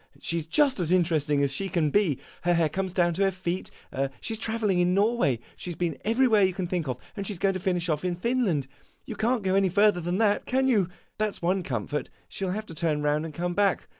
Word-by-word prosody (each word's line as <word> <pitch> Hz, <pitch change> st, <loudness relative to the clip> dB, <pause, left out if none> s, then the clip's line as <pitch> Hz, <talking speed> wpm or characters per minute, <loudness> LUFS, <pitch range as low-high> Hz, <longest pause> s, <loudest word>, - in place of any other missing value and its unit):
She 170 Hz, -, -1 dB
is 160 Hz, -, -7 dB
just 275 Hz, -, +3 dB
as 170 Hz, -2 st, 0 dB
interesting 155 Hz, -5 st, +2 dB
as 140 Hz, -1 st, 0 dB
she 195 Hz, +6 st, -1 dB
can 160 Hz, -4 st, +1 dB
be. 180 Hz, -9 st, +2 dB, 0.2 s
Her 175 Hz, 0 st, +2 dB
hair 165 Hz, -2 st, +2 dB
comes 190 Hz, +4 st, -2 dB
down 175 Hz, -1 st, +2 dB
to 185 Hz, -, -3 dB
her 195 Hz, -, +4 dB
feet. 185 Hz, -1 st, -4 dB, 0.5 s
She 225 Hz, -, -3 dB
's 220 Hz, -, -5 dB
travelling 220 Hz, -5 st, 0 dB
in 180 Hz, +1 st, +3 dB
Norway. 205 Hz, -, +2 dB, 0.2 s
She -, -, -6 dB
has 175 Hz, -, -4 dB
been 175 Hz, -1 st, -2 dB
everywhere 225 Hz, -1 st, +3 dB
you 185 Hz, -2 st, +3 dB
can 190 Hz, -3 st, -2 dB
think 175 Hz, -3 st, -2 dB
of, 125 Hz, -1 st, -2 dB, 0.2 s
and 200 Hz, -2 st, -4 dB
she 205 Hz, -, -3 dB
's -, -, -10 dB
going 195 Hz, +2 st, +1 dB
to 185 Hz, -, -3 dB
finish 180 Hz, -1 st, 0 dB
off 150 Hz, -3 st, 0 dB
with 180 Hz, -1 st, -2 dB
Finland. 215 Hz, -, +1 dB, 0.4 s
You -, -, -6 dB
can't 230 Hz, 0 st, 0 dB
go 190 Hz, -1 st, +1 dB
any 195 Hz, -1 st, +3 dB
further 200 Hz, 0 st, +3 dB
than 175 Hz, +2 st, -1 dB
that, 210 Hz, -2 st, +2 dB
can 265 Hz, +1 st, +2 dB
you? 205 Hz, -9 st, +3 dB, 0.3 s
That 215 Hz, -1 st, 0 dB
's -, -, -11 dB
one 185 Hz, +2 st, +2 dB
comfort; 135 Hz, -, -3 dB, 0.2 s
she -, -, -6 dB
will 185 Hz, -, 0 dB
have 215 Hz, +2 st, -4 dB
to 165 Hz, -, -10 dB
turn 155 Hz, -2 st, -1 dB
round 150 Hz, +1 st, +1 dB
and 160 Hz, -, -7 dB
come 175 Hz, +1 st, -2 dB
back. 200 Hz, 0 st, +1 dB
180 Hz, 255 wpm, -27 LUFS, 165-205 Hz, 0.5 s, her